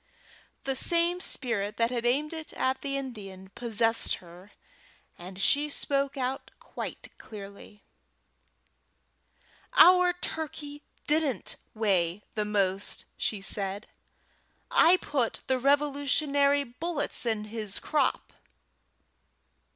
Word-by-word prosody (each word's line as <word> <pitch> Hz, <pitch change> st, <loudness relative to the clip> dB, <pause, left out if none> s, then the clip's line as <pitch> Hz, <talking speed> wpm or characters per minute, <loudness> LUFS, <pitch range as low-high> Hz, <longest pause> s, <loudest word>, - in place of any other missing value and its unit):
The 270 Hz, 0 st, -1 dB
same 340 Hz, +5 st, +2 dB
spirit 215 Hz, -, -1 dB
that 230 Hz, +1 st, +2 dB
had 240 Hz, -1 st, 0 dB
aimed 295 Hz, +6 st, +1 dB
it 320 Hz, -1 st, -5 dB
at 260 Hz, 0 st, 0 dB
the 275 Hz, -1 st, -2 dB
Indian 195 Hz, -8 st, -8 dB
possessed 225 Hz, -1 st, +1 dB
her, 180 Hz, +3 st, -15 dB, 0.6 s
and 185 Hz, +2 st, -10 dB
she 290 Hz, +8 st, +3 dB
spoke 280 Hz, -1 st, -1 dB
out 260 Hz, 0 st, -3 dB
quite -, -, -7 dB
clearly: 205 Hz, -1 st, -11 dB, 1.9 s
"Our 360 Hz, 0 st, +7 dB
turkey 300 Hz, -4 st, -5 dB, 0.2 s
didn't 300 Hz, -4 st, 0 dB, 0.2 s
weigh 195 Hz, -3 st, +1 dB
the 210 Hz, -1 st, -1 dB
most," 200 Hz, -2 st, 0 dB
said 200 Hz, 0 st, -2 dB
she. -, -, -33 dB, 0.7 s
"I 345 Hz, +3 st, +6 dB
put 270 Hz, -9 st, -1 dB
the 260 Hz, 0 st, +1 dB
Revolutionary 285 Hz, +1 st, +2 dB
bullets 290 Hz, +5 st, -3 dB
in 220 Hz, -2 st, 0 dB
his 215 Hz, -2 st, -4 dB
crop." 295 Hz, -4 st, 0 dB
255 Hz, 105 wpm, -28 LUFS, 210-290 Hz, 1.9 s, Our